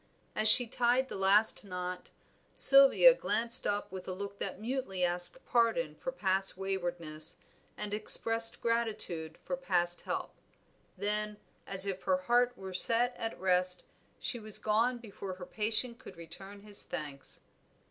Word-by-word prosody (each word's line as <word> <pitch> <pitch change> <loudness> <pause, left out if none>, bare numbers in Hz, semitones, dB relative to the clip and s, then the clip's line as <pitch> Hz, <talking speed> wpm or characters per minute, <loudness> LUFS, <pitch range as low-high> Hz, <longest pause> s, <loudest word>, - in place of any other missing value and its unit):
As 215 0 +3
she 245 +3 +8
tied 250 +2 0
the - - -6
last 200 +4 +2
knot, 180 -2 -7 0.5
Sylvia 275 - +8
glanced 230 - +1
up 205 -2 -3
with 185 -1 -9
a 185 - -4
look 200 +1 -8
that 195 -1 -5
mutely 230 -5 -3
asked 175 +5 -2
pardon 225 -10 0
for 260 - -6
past 195 -6 -1
waywardness, 175 -5 -5 0.4
and 205 - -5
expressed 225 +2 +4
gratitude 215 -9 -3
for 180 - -3
past 175 -1 -2
help; - - -5 0.6
then, 210 +1 +1 0.3
as 195 0 +4
if 190 -1 -5
her 185 -1 0
heart 245 +6 0
were 190 -1 -9
set 235 +6 0
at 225 - -6
rest, 180 0 0 0.4
she 240 - -5
was 215 -1 -5
gone 230 +4 0
before 200 -5 -9
her 180 -1 -10
patient 225 +4 -2
could 260 - -14
return 195 +5 -12
his 205 -1 -4
thanks. 145 -3 -8
200 Hz, 145 wpm, -30 LUFS, 180-230 Hz, 0.6 s, she